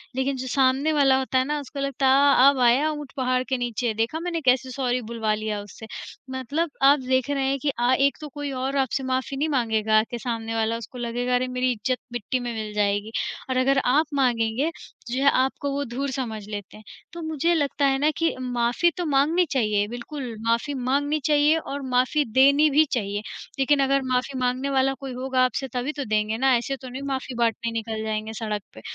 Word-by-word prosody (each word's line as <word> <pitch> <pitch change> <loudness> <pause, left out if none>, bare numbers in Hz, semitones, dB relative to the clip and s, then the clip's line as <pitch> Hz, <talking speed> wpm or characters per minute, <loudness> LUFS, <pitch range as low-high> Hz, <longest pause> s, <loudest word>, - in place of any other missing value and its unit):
लेकिन 265 +1 0
जो 260 0 -5
सामने 270 +4 +2
वाला 275 -3 +4
होता 260 0 -1
है 255 - +1
ना 295 +1 -1
उसको 280 0 -8
लगता 275 -1 0
है 280 +2 +5
अ, 265 +2 +7
अब 280 -2 0
आया 250 +5 +4
ऊँट 295 -2 -7
पहाड़ 255 -1 +1
के 260 - +1
नीचे। 240 -1 -2
देखा 225 +8 -1
मैंने 340 -1 -3
कैसे 260 -1 +2
सॉरी 250 -1 -1
बुलवा 225 -1 -2
लिया 215 -1 -3
उससे। 205 +2 -11 0.5
मतलब 280 +6 -2
आप 280 +2 +6
देख 260 0 0
रहे 280 -1 0
हैं 275 - 0
कि 285 - -1
अ, 245 +1 +3
एक 275 0 +3
तो 300 - -6
कोई 290 0 -5
और 265 +1 -2
आपसे 265 0 0
माफ़ी 260 +1 -2
नहीं 305 +3 0
माँगेगा 220 -5 +2
कि 240 - -4
सामने 225 -1 -3
वाला 225 0 0
उसको 230 +2 -10
लगेगा 245 +1 -1
अरे 250 +1 +1
मेरी 255 0 0
इज़्ज़त 245 +2 -1 0.2
मिट्टी 240 +2 -2
में 240 -1 -4
मिल 215 -1 -5
जाएगी। 205 +1 0 0.4
और 260 - 0
अगर 270 +2 +3
आप 285 +6 +3
माँगेंगे 245 +1 +1
तो 240 -6 -12
जो 265 +2 0
है 280 - +7
आपको 265 +2 0
वो 280 +1 -1
धूर 270 +3 -3
समझ 235 -5 -4
लेते 205 -1 -7
हैं। 215 - -15 0.3
तो 340 - -7
मुझे 315 +1 0
लगता 285 -3 +1
है 270 -1 +3
ना 295 +2 +3
कि 330 0 +1
माफ़ी 245 +6 +1
तो 355 - -2
माँगनी 305 +5 +3
चाहिए 210 -5 +1
बिल्कुल 245 +1 -6
माफ़ी 235 +5 +1
माँगनी 280 +4 0
चाहिए 300 +1 +4
और 285 -3 -5
माफ़ी 255 +4 +3
देनी 280 +4 +5
भी 300 +2 +4
चाहिए। 205 -4 -1 0.4
लेकिन 280 +2 +3
अगर 275 +1 +2
माफ़ी 255 +2 0
माँगने 255 +2 0
वाला 270 0 +2
कोई 270 -2 -6
होगा 255 0 0
आपसे 260 +2 -2
तभी 250 +3 -1
तो 280 - -2
देंगे 215 0 0
ना 265 +1 +4
ऐसे 255 +3 -3
तो 260 - -10
उन्हें 255 +2 -7
माफ़ी 260 -1 -4
बाँटने 230 0 0
निकल 225 -1 -4
जाएँगे 215 0 -3
सड़क 210 -2 -3
पे। 110 - -12
260 Hz, 215 wpm, -24 LUFS, 235-280 Hz, 0.5 s, अ